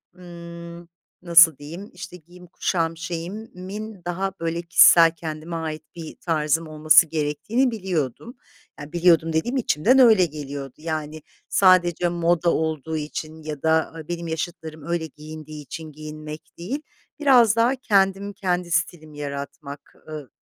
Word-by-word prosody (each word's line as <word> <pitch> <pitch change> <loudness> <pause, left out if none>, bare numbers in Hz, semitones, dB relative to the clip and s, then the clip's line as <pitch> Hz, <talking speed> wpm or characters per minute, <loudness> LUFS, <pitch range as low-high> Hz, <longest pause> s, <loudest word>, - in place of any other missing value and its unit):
ımm, 170 -1 -10 0.3
nasıl 170 -4 +6
diyeyim, 165 +8 -9
işte, 180 0 -9
giyim 180 +2 -17
kuşam 165 -1 -1
şeyimin 185 +4 -7
daha, 190 +2 -2
böyle, 165 +1 -2
kişisel 170 -1 +7
kendime 160 +1 -6
ait 155 -1 -4
bir 165 -2 -8
tarzım 160 -1 -1
olması 155 +1 +5
gerektiğini 160 - -1
biliyordum. 190 - -4 0.4
Ya, 145 +1 -9
biliyordum 165 -2 +3
dediğim 240 +12 0
içimden 245 - +3
öyle 220 -7 +7
geliyordu. 140 -3 -7
Yani, 155 -1 -5 0.3
sadece 175 -2 +4
moda 170 0 +1
olduğu 160 0 -2
için 155 +1 -6
ya 150 -2 -6
da 160 0 +1
a 160 -2 -10
benim 170 -1 -4
yaşıtlarım 160 -1 -5
öyle 170 -1 -1
giyindiği 155 0 -10
için 155 +2 -8
giyinmek 155 +1 -8 0.2
değil, 245 - -4 0.4
biraz 245 -7 +5
daha 235 +3 +3
kendim 200 -4 +1
kendi 180 -2 -2
stilimi 160 -3 -2
yaratmak. 140 0 -7 0.2
I 150 -4 -7
165 Hz, 130 wpm, -23 LUFS, 155-180 Hz, 0.4 s, kişisel